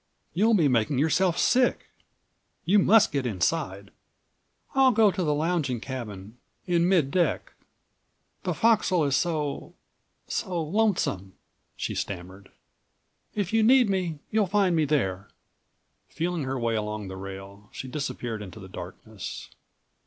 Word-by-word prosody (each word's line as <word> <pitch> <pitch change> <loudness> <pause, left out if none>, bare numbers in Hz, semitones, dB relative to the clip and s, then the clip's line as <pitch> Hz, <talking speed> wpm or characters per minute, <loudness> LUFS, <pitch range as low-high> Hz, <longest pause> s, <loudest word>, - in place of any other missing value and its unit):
"You'll 215 +6 +3
be 165 -7 +4
making 125 +1 +1
yourself 165 +5 +2
sick. 250 0 +2 0.7
You 205 +4 +5
must 215 +3 +5
get 140 -3 -1
inside!" 100 - -2 0.8
"I'll 270 -1 +5
go 220 -3 +4
to 185 - -2
the 150 - +1
lounging 155 -5 0
cabin 110 -3 -7 0.3
in 175 -1 +2
mid 165 -8 +3
deck. 175 +1 0 0.9
The - - -2
forecastle 215 -8 +3
is 140 -1 +1
so—so 165 +3 -4
lonesome," 160 - 0 0.4
she - - -3
stammered. 95 +1 -6 0.9
"If 205 -1 -2
you 225 - +4
need 240 -1 +5
me, 180 -5 -1
you'll 215 -2 +2
find 195 -2 +2
me 160 -2 +2
there." 100 -11 -1 0.8
Feeling 170 -3 -2
her 135 0 -2
way 115 -1 0
along 105 -1 -3
the 95 - -7
rail, 95 +2 -9
she 130 - -7
disappeared 125 -5 -4
into 105 +1 -9
the 95 - -10
darkness. 95 +3 -8
150 Hz, 130 wpm, -26 LUFS, -, 0.9 s, You